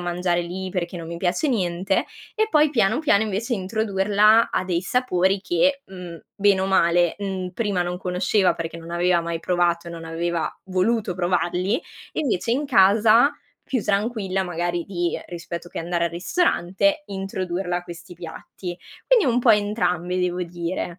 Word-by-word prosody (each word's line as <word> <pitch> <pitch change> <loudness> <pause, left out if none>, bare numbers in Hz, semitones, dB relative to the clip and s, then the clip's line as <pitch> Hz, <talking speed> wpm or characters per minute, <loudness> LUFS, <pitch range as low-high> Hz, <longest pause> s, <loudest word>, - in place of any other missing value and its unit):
mangiare 175 0 0
lì 185 +2 -5
perché 180 -1 -3
non 165 -1 -7
mi 170 - -5
piace 180 - 0
niente." 190 -4 0 0.3
E 435 0 +1
poi 305 -5 +4
piano, 225 -2 +2
piano 250 -10 +3
invece 220 +3 -1
introdurla 210 +2 +3
a - - 0
dei 175 -2 0
sapori 190 -4 +1
che, 275 +10 +1
mhmm, 180 -3 -9 0.2
bene 200 -2 +3
o 190 - 0
male, 175 -2 +3
mhmm, 190 -2 -3
prima 200 -2 -1
non 175 0 -3
conosceva 185 0 +1
perché 165 0 -5
non 165 0 -10
aveva 175 0 +2
mai 170 -1 -4
provato 175 -1 0
e - - -7
non 165 -1 -8
aveva 165 +1 -2 0.2
voluto 190 +2 0
provarli, 180 +4 0 0.3
invece 230 - -1
in 275 +5 0
casa 215 +5 +5 0.3
più 255 -5 -1
tranquilla, 200 -2 0
magari, 175 -1 -2
di 175 -3 -2
rispetto 170 0 -7
che - - -7
andare 170 +1 -1
al 170 - -1
ristorante, 195 - +1
introdurla 190 -2 -3
a - - -9
questi 170 +1 -10
piatti, 175 +1 -8 0.3
quindi - - +5
un 240 - +2
po' 240 - +5
entrambi 205 -4 +1
devo 180 0 -1
dire. 175 +1 -4
185 Hz, 165 wpm, -23 LUFS, 175-210 Hz, 0.3 s, casa